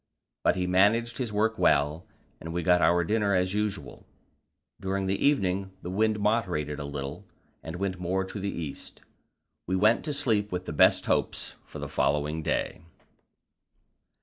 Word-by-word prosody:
But -, -, +3 dB
he 90 Hz, -1 st, -1 dB
managed 110 Hz, +7 st, +2 dB
his 120 Hz, -4 st, -2 dB
work 110 Hz, +2 st, 0 dB
well, 75 Hz, +3 st, +2 dB, 0.3 s
and 80 Hz, -, -7 dB
we 85 Hz, +1 st, -2 dB
got 90 Hz, 0 st, +4 dB
our 85 Hz, 0 st, +4 dB
dinner 105 Hz, +1 st, +1 dB
as 90 Hz, +1 st, +1 dB
usual. 105 Hz, -1 st, -3 dB, 0.7 s
During 95 Hz, 0 st, -2 dB
the 95 Hz, +1 st, -1 dB
evening 95 Hz, -9 st, +1 dB
the 90 Hz, -, -4 dB
wind 110 Hz, +2 st, +1 dB
moderated 90 Hz, -9 st, 0 dB
a 70 Hz, -, -4 dB
little, 70 Hz, -1 st, -6 dB, 0.3 s
and 80 Hz, +1 st, -7 dB
went 95 Hz, 0 st, -3 dB
more 95 Hz, +2 st, 0 dB
to 100 Hz, -, -6 dB
the 100 Hz, +1 st, -2 dB
east; 80 Hz, -7 st, -6 dB, 0.7 s
we 95 Hz, -, 0 dB
went 110 Hz, +5 st, +3 dB
to 150 Hz, -, -2 dB
sleep 110 Hz, -8 st, 0 dB
with 90 Hz, 0 st, -3 dB
the -, -, -5 dB
best -, -, +4 dB
hopes -, -, -1 dB
for -, -, -10 dB
the -, -, -5 dB
following 75 Hz, +2 st, 0 dB
day. 80 Hz, -, -2 dB
95 Hz, 165 wpm, -28 LUFS, 85-105 Hz, 0.7 s, got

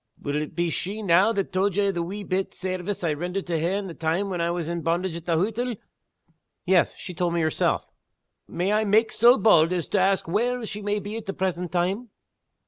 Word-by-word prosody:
Will 145 Hz, +1 st, -2 dB
it 150 Hz, -, -6 dB
be 175 Hz, -1 st, 0 dB
she 205 Hz, +7 st, -3 dB
now 185 Hz, +3 st, +4 dB
that 200 Hz, -4 st, -2 dB
told 190 Hz, 0 st, +1 dB
ye 205 Hz, 0 st, +2 dB
of 195 Hz, -, +1 dB
the 170 Hz, -, -2 dB
wee 195 Hz, +5 st, -5 dB
bit 190 Hz, 0 st, -2 dB
sairvice 185 Hz, +1 st, -4 dB
I 160 Hz, -3 st, +1 dB
rendered 180 Hz, +5 st, -3 dB
to 170 Hz, -2 st, -1 dB
her 165 Hz, +2 st, 0 dB
in 205 Hz, -, -4 dB
the 180 Hz, -, -6 dB
time 165 Hz, +5 st, -1 dB
when 175 Hz, -2 st, -2 dB
I 170 Hz, -, +1 dB
was 170 Hz, -2 st, -2 dB
in 170 Hz, 0 st, -3 dB
bondage 170 Hz, +2 st, -1 dB
at 170 Hz, -1 st, -7 dB
the 165 Hz, -2 st, +1 dB
hottle?" 225 Hz, +6 st, -1 dB, 0.9 s
"Yes 180 Hz, -2 st, +3 dB
she 180 Hz, -, -8 dB
told 175 Hz, -1 st, -1 dB
me 170 Hz, -, +1 dB
herself." 155 Hz, -1 st, +1 dB, 0.6 s
"Might 180 Hz, +3 st, -1 dB
I 215 Hz, +1 st, +3 dB
mak' 215 Hz, +2 st, +3 dB
sae 240 Hz, +3 st, +6 dB
bauld 170 Hz, -9 st, +5 dB
as 175 Hz, -4 st, -1 dB
to 205 Hz, -, +2 dB
ask 190 Hz, +1 st, +2 dB
whar' 235 Hz, +6 st, 0 dB
she 210 Hz, 0 st, -6 dB
may 205 Hz, 0 st, -1 dB
be 205 Hz, +2 st, -5 dB
at 225 Hz, -, -8 dB
the 195 Hz, -, -2 dB
present 180 Hz, -2 st, -2 dB
time?" 190 Hz, +7 st, -1 dB
185 Hz, 230 wpm, -25 LUFS, 170-205 Hz, 0.9 s, sae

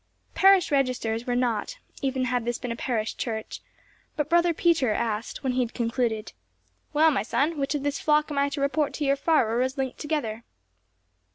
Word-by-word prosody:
Parish 385 Hz, -3 st, +5 dB
registers 250 Hz, -4 st, 0 dB
were 245 Hz, -, 0 dB
not, 245 Hz, -, -1 dB, 0.2 s
even 265 Hz, -2 st, 0 dB
had 250 Hz, -1 st, 0 dB
this 240 Hz, 0 st, -2 dB
been 245 Hz, -2 st, -5 dB
a -, -, -2 dB
parish 230 Hz, -2 st, -2 dB
church, 220 Hz, -2 st, -4 dB, 0.5 s
but 295 Hz, 0 st, -2 dB
Brother 345 Hz, 0 st, +4 dB
Peter 325 Hz, -7 st, +2 dB
asked, 220 Hz, +4 st, -2 dB
when 260 Hz, -2 st, 0 dB
he 255 Hz, -, 0 dB
had 240 Hz, -2 st, -3 dB
concluded, 230 Hz, -2 st, -1 dB, 0.6 s
"Well, 315 Hz, +1 st, +4 dB
my 270 Hz, -, +1 dB
son, 290 Hz, +8 st, 0 dB
which 275 Hz, +2 st, -1 dB
of 285 Hz, -, -2 dB
his 285 Hz, 0 st, -1 dB
flock 300 Hz, 0 st, +2 dB
am 285 Hz, -, 0 dB
I 280 Hz, 0 st, +2 dB
to 280 Hz, 0 st, -4 dB
report 285 Hz, +1 st, 0 dB
to 295 Hz, -, -2 dB
your 275 Hz, 0 st, +3 dB
Pfarrer 260 Hz, -6 st, +2 dB
as 260 Hz, +2 st, -1 dB
linked 265 Hz, -1 st, -3 dB
together?" 265 Hz, -8 st, -3 dB
265 Hz, 190 wpm, -26 LUFS, 235-300 Hz, 0.6 s, Parish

